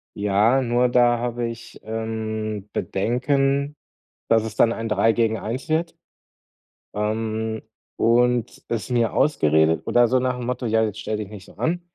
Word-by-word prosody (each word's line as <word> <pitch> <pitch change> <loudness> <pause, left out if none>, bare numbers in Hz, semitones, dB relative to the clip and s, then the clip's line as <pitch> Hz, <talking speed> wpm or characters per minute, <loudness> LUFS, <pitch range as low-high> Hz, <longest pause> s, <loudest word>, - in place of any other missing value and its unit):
Ja, 105 +6 +2
nur 120 +1 +2
da 120 -1 +3
habe 120 0 -2
ich, 115 0 -9
ähm, 110 -2 -4
Bedenken, 135 - 0 0.5
dass 115 -1 +4
es 110 -1 -6
dann 115 +1 +4
ein 115 0 -4
3 115 +1 +3
gegen 110 -1 +1
1 125 +8 -5
wird 165 +2 0 1.0
ähm, 110 +1 -2 0.4
und 120 0 +2
es 115 +1 -3
mir 120 -2 +1
ausgeredet 80 - +3
oder 120 0 +4
so 130 +2 +2
nach'm 125 -1 -2
Motto: 125 +1 -3
„Ja, 110 0 +2
jetzt 110 -1 -3
stell 110 -1 -3
dich 105 -2 -6
nicht 100 -3 -10
so - - -17
an. 175 +2 -1
115 Hz, 155 wpm, -23 LUFS, 110-125 Hz, 1.0 s, dass